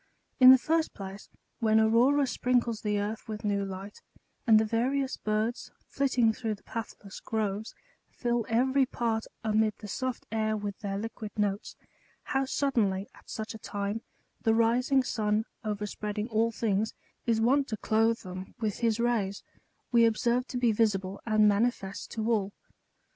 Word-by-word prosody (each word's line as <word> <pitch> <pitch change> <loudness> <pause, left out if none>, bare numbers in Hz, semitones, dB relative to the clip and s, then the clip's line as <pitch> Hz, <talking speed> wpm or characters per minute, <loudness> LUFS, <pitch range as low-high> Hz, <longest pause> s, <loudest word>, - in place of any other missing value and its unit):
In 255 -1 +10
the 260 - +10
first 320 +4 0
place, 195 0 -8 0.3
when 220 -1 +4
Aurora 245 +6 +4
sprinkles 245 -3 0
the 210 -1 0
earth 210 +2 -4
with 215 -1 -5
new 200 -1 +1
light, 195 +1 -7 0.5
and 220 -1 +7
the 220 - +2
various 260 +5 0
birds, 215 +3 -2 0.2
flit 275 -1 -1
ting 230 -3 +4
through 225 -2 -3
the 200 - -24
pathless 210 -3 -7
groves, 215 -1 -3 0.3
fill 240 -1 -1
every 260 +3 +3
part, 225 -3 -1 0.2
amid 215 -1 +2
the 210 - -9
soft 255 +4 -3
air, 215 -1 0
with 205 -1 -5
their 195 -3 -3
liquid 220 0 -5
notes; 205 0 -1 0.5
how 270 0 0
suddenly, 220 -9 0
at - - -19
such 220 +1 -5
a 220 - -9
time, 205 +2 -3 0.4
the 225 0 +3
rising 250 +4 +3
sun, 215 -2 0 0.2
overspreading 210 0 -3
all 225 +1 +2
things, 220 -1 -1 0.3
is 230 -1 +3
wont 270 +5 +3
to 220 - -3
clothe 225 +1 +2
them 185 0 -8
with 215 -3 -2
his 230 -1 +1
rays, 220 -5 0 0.5
we 235 -1 +6
observe 240 +2 +1
to 250 - -4
be 245 -2 +3
visible 200 -3 0
and 215 -1 +5
manifest 205 -2 0
to 220 -1 -3
all. 205 -3 0
220 Hz, 160 wpm, -29 LUFS, 210-240 Hz, 0.5 s, In